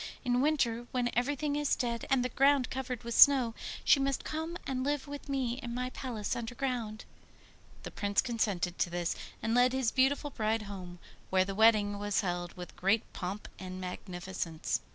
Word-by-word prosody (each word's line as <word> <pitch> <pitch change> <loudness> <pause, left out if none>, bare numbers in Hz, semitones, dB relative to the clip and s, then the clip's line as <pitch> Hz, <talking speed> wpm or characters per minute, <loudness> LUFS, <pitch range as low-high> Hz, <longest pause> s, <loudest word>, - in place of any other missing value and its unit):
In 245 0 +2
winter, 240 -6 +1
when 245 -1 0
everything 285 +4 0
is 295 -1 +1
dead 235 -2 -2
and 260 -2 +3
the - - 0
ground 275 +1 +3
covered 255 -2 -4
with 235 0 -4
snow, 260 -3 +7 0.3
she 280 - +6
must 275 0 0
come 320 +2 -4
and 255 -1 -2
live 290 0 -1
with 285 0 -8
me 260 -2 -1
in 240 -2 -5
my 250 +1 -2
palace 230 -7 -3
underground.' 235 -2 -3 0.8
The - - -6
Prince 205 -1 0
consented 205 -8 0
to - - +2
this, 175 0 -1 0.3
and 225 - 0
led 250 +1 +4
his 260 -3 +1
beautiful 275 +2 +2
bride 220 -2 0
home, 185 -3 -8 0.3
where 185 0 +3
the 195 - -4
wedding 210 -1 +4
was 205 0 +1
held 175 -2 -3
with 180 0 -8
great 195 +5 +1
pomp 190 +3 -5
and 185 0 -6
magnificence. 180 -2 -4
235 Hz, 175 wpm, -31 LUFS, 200-265 Hz, 0.8 s, snow